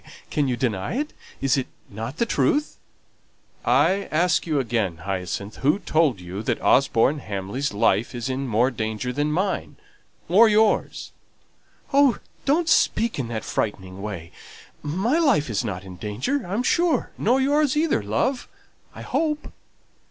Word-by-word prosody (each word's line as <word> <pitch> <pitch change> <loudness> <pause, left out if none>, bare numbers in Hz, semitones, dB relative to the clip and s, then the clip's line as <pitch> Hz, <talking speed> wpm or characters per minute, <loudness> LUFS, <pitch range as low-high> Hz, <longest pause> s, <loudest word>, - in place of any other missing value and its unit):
can 145 -2 +1
you 125 -2 -1
deny 110 - -1
it? 300 +3 -2 0.3
Is 135 +1 +2
it 130 - -1 0.2
not 115 +8 -6
the 235 - +2
truth?" 300 +5 0 0.8
"I 195 +1 +3
ask 170 +2 +2
you 155 -3 +1
again, 110 -10 -1
Hyacinth, 95 +1 -4
who 150 +6 +2
told 155 - +1
you 90 +3 -6
that - - -1
Osborne 135 +2 +3
Hamley's 105 +5 -3
life 105 +3 +1
is 120 0 -3
in 135 +1 -2
more 120 +3 +2
danger 110 +1 -3
than 145 +3 0
mine 190 +5 -1 0.5
or 215 +6 +6
yours?" 215 0 +1 0.8
"Oh, 280 -2 +5 0.3
don't 315 +4 +2
speak 230 - +2
in 125 - -2
that 115 -1 -4
frightening 95 -3 -3
way. 95 -6 -6 0.5
My 190 - 0
life 235 - +2
is 105 +2 0
not 95 -5 -4
in 95 -2 -10
danger, 120 - -2
I'm 205 +7 -1
sure; 340 +4 +1
nor 250 +5 +2
yours 290 +1 +2
either, 315 - +2
love, 175 - -1 0.5
I - - -8
hope." 305 -2 -2
135 Hz, 150 wpm, -24 LUFS, -, 0.8 s, or